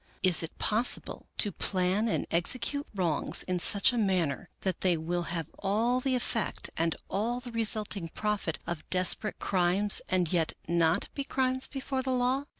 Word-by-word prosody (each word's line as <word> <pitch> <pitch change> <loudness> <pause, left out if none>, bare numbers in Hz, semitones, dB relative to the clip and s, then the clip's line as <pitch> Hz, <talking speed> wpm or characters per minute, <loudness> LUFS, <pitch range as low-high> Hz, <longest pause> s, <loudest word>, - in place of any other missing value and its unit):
Is 185 -3 +4
it 165 - -6
possible 225 +3 0
to 205 - +4
plan 185 +4 0
and 220 - -1
execute 255 - +1
wrongs 170 -6 0
in 180 -1 -2
such 200 +7 +2
a 240 - 0
manner 180 -9 0
that 190 -3 -2
they 180 -3 +2
will 175 +2 -2
have 165 -3 -3
all 225 +6 +1
the 260 0 0
effect 230 -3 0
and 165 0 0
all 230 +5 -1
the 245 -1 -9
resulting 215 -5 +2
profit 210 -4 -2
of 170 -2 -6
desperate 185 +3 +1
crimes 190 +2 +2
and 185 -2 +1
yet 165 -3 +1
not 170 +2 +2
be 280 - -3
crimes 260 -1 0
before 270 -1 -3
the 260 - -4
law? 255 +3 +1
195 Hz, 165 wpm, -29 LUFS, 175-240 Hz, -, Is